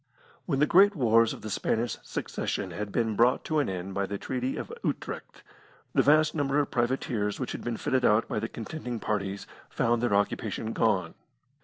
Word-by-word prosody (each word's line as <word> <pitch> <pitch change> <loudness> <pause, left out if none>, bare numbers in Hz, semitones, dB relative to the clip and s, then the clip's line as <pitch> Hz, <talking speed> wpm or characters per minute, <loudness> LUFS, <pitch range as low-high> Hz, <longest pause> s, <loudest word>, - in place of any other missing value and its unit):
When 145 -6 +1
the 150 - +4
great 195 +6 +6
wars 115 -5 +4
of - - -8
the 110 - -5
Spanish 115 +4 0
Succession - - -3
had 105 -1 -5
been 110 -1 0
brought 120 +4 +3
to 155 -1 +1
an 145 - 0
end 95 +1 -4
by 100 0 -1
the 100 - -3
Treaty 130 +4 -3
of - - -6
Utrecht, - - -4 0.5
the - - +5
vast 155 +1 +4
number 145 -2 0
of 145 -1 +1
privateers 120 -4 -1
which 130 - -3
had - - -6
been 120 -2 -2
fitted 130 -1 0
out 105 0 +4
by - - -2
the 115 - -3
contending 120 0 -5
parties 100 -2 -2 0.2
found 120 -1 +1
their 120 -4 +2
occupation 105 +2 -1
gone. 95 -7 +1
115 Hz, 190 wpm, -28 LUFS, 105-135 Hz, 0.5 s, great